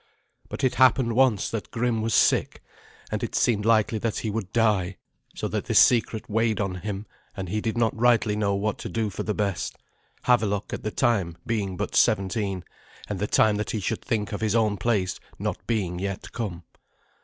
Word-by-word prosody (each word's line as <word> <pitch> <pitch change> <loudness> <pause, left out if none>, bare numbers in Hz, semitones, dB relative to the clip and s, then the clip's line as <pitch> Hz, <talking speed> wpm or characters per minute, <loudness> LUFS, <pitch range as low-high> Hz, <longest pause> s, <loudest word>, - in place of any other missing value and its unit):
But - - -6
it 130 - +3
happened 130 -2 +4
once 125 -5 +3
that 110 -2 -4
Grim 115 -1 0
was 110 -2 0
sick, - - +2 0.5
and - - -2
it - - -3
seemed 105 -4 +2
likely 110 -1 +3
that 115 0 -2
he 110 - -2
would 100 -3 -4
die, 100 -6 +1 0.4
so - - -2
that - - -2
this - - +1
secret 115 -2 +4
weighed 110 -1 +1
on 100 -3 -1
him, 100 +2 -5 0.3
and 95 -1 -4
he 105 +3 -1
did 115 +1 -2
not 115 -1 +2
rightly 115 -2 +3
know 100 -2 +1
what 105 +1 -1
to - - -5
do 110 -3 -1
for - - -5
the 105 - -2
best, 100 -5 -2 0.5
Havelok 105 -5 +1
at - - -4
the 110 - -2
time 100 -8 0
being 105 -6 -2
but - - -3
seventeen, 95 -2 +1 0.5
and 105 -3 -3
the 105 - -1
time 105 -1 +3
that 105 - -3
he 110 - -1
should 95 - -2
think 105 -3 -1
of 105 - -4
his 110 0 +1
own 110 -3 +2
place 100 -4 0 0.2
not - - -4
being 95 -7 -1
yet 100 0 -4
come. 95 -7 -4
105 Hz, 200 wpm, -25 LUFS, 100-115 Hz, 0.5 s, happened